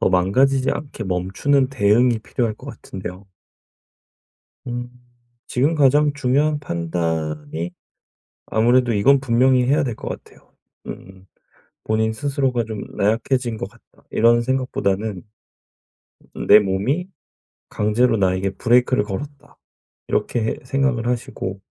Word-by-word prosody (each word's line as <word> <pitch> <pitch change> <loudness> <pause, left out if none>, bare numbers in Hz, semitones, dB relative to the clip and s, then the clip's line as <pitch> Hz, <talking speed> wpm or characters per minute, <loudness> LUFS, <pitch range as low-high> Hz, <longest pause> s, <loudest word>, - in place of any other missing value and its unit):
더 - - +3
망가지지 130 +9 +2
않게 140 -7 -5
멈추는 95 +10 +1
대응이 120 -1 +3
필요할 110 0 -2
것 - - -14
같은데요. 95 +1 -8 1.4
음. 120 0 -4 0.6
지금 140 +7 +1
가장 145 +1 +4
중요한 145 +2 +1
판단이 80 - -3 0.7
아무래도 120 +2 +2
이건 135 +7 +4
분명히 125 0 +3
해야 145 +4 +2
될 120 -5 -3
것 - - -7
같아요. - - -11 0.4
음 95 0 -10 0.6
본인 110 0 +1
스스로가 135 -1 -1
좀 110 -2 -6
'나약해진 115 +3 0
것 95 - -4
같다.' 115 +2 -26
이런 120 +1 +4
생각보다는 110 -6 -1 1.1
음 - - -5
'내 105 +1 +9
몸이 105 - -1 0.6
강제로 115 +3 +1
나에게 95 0 +1
브레이크를 120 +3 +2
걸었다.' 140 +8 -8 0.5
이렇게 110 -2 -1
생각을 135 -3 0
하시고 100 -5 -3
115 Hz, 270 characters per minute, -21 LUFS, 100-130 Hz, 1.4 s, 내